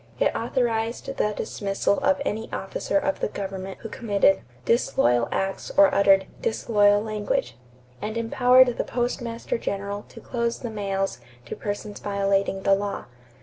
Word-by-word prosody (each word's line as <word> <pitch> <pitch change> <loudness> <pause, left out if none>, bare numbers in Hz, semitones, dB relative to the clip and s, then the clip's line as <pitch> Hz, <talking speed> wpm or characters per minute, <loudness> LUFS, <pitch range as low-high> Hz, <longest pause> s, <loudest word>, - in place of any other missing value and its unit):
It - - +2
authorized 235 +1 -1
the 210 - +1
dismissal 200 -1 -1
of 285 0 +2
any 220 -3 -3
officer - - -2
of 290 0 0
the - - 0
government 195 -2 -6
who 225 - -6
committed 200 -5 +2 0.2
"disloyal 120 - +2
acts" 195 0 -2
or 295 -1 +7
uttered 195 -2 +5 0.2
"disloyal 205 -2 +3
language," 205 - -2 0.5
and 215 +2 -3
empowered 245 +2 +4
the - - +2
Postmaster 240 -1 -2
General 200 0 -4
to - - -12
close 235 -1 -2
the 235 - -6
mails 195 -6 -2 0.3
to - - -6
persons 205 0 -5
violating 195 -1 0
the 195 - +4
law. 200 +1 -2
210 Hz, 145 wpm, -25 LUFS, 195-235 Hz, 0.5 s, or